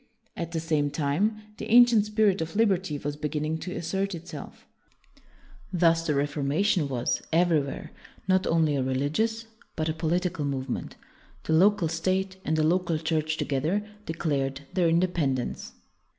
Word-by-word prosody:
At 170 0 -4
the 165 - -1
same 155 -3 0
time, 160 +10 0
the - - -6
ancient 235 -3 +6
spirit 210 -4 +2
of 160 +2 -4
liberty 190 -8 +1
was 145 +1 -4
beginning 150 +1 -2
to 180 - -5
assert 190 +3 -2
itself. 170 +1 -9 1.1
Thus 165 -2 +3
the 150 - +1
Reformation 145 +5 +1
was, 125 -2 -1
everywhere, 160 -4 +1 0.4
not 185 0 +2
only 160 -3 +2
a 135 - 0
religious 150 - -1 0.3
but 160 0 -1
a - - 0
political 165 0 -1
move 135 -2 -2
ment. - - -4 0.5
The 160 - -1
local 185 +1 +4
state 185 +4 -1
and 155 +1 0
the 155 - +2
local 175 0 +1
Church 155 0 -1
together 160 +10 -1 0.2
declared 140 -4 -1
their 175 -3 +3
independ 165 -5 +1
ence. 125 - -5
165 Hz, 150 wpm, -27 LUFS, 145-185 Hz, 1.1 s, ancient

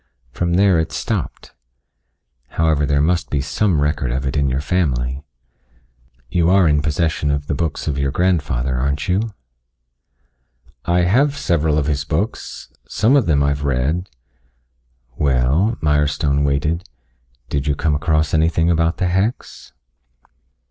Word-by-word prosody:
From 85 +5 -1
there 95 -2 +4
it 80 - -2
stopped. - - -4 1.0
However, 80 -3 +2
there 70 0 +2
must 80 -4 0
be 70 - -1
some 85 +4 0
record 75 -3 -1
of 65 +2 -2
it 65 - -2
in 70 -2 +1
your 65 +1 -1
family. 70 -5 -1 1.0
You 85 +6 +1
are 95 -2 +4
in 75 -1 +2
possession 75 0 -1
of 70 0 -1
the 75 - -2
books 80 +1 -3
of 70 -2 -1
your 70 0 0
grandfather, 70 -7 0
aren't 70 +3 -1
you?" 100 +4 -1 1.5
"I 90 +1 +2
have 135 +11 +2
several 80 - +1
of 75 - +1
his 75 -1 -1
books. - - -4
Some 110 - +2
of 135 -8 +3
them 70 -3 +3
I 70 - +2
have 70 0 -2
read." 70 +7 -1 1.1
"Well," 70 - +1
Mirestone 75 -1 +1
waited. 75 +3 -1 0.6
"Did 70 0 -2
you 75 - +1
come 80 +1 0
across 75 0 0
anything 80 +1 +2
about 80 0 +1
the 90 - 0
hex?" 95 +7 -2
75 Hz, 145 wpm, -19 LUFS, 70-85 Hz, 1.5 s, there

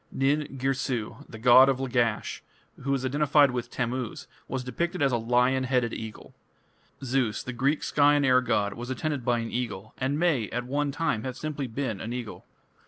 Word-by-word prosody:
Nin 140 +1 0
Girsu, 130 -4 -2
the 110 - -9
god 125 +3 +7
of 130 -1 0
Lagash, 120 -4 -1 0.4
who 135 - -4
was 135 -1 0
identified 145 +1 +4
with 120 -1 -4
Tammuz, 125 -1 -3 0.2
was 130 0 -3
depicted 170 +9 -2
as 140 -2 +3
a 120 - +2
lion 125 +3 +2
headed 125 -3 +1
eagle. 110 -1 -8 0.7
Zeus, 125 -4 0
the 125 - -5
Greek 140 +5 0
sky 145 0 +4
and 145 -1 +2
air 130 -1 +5
god, 105 -5 0
was 120 +2 -7
attended 145 0 -2
by 120 0 +2
an 115 -1 -4
eagle, 110 -4 -4
and 135 +3 0
may, 150 - +1
at 120 0 -3
one 145 +2 -1
time, 155 -3 0
have 130 -1 -4
been 155 0 -3
simply 120 - -9
an 115 -1 -3
eagle. 120 -4 -6
130 Hz, 185 wpm, -27 LUFS, 120-140 Hz, 0.7 s, god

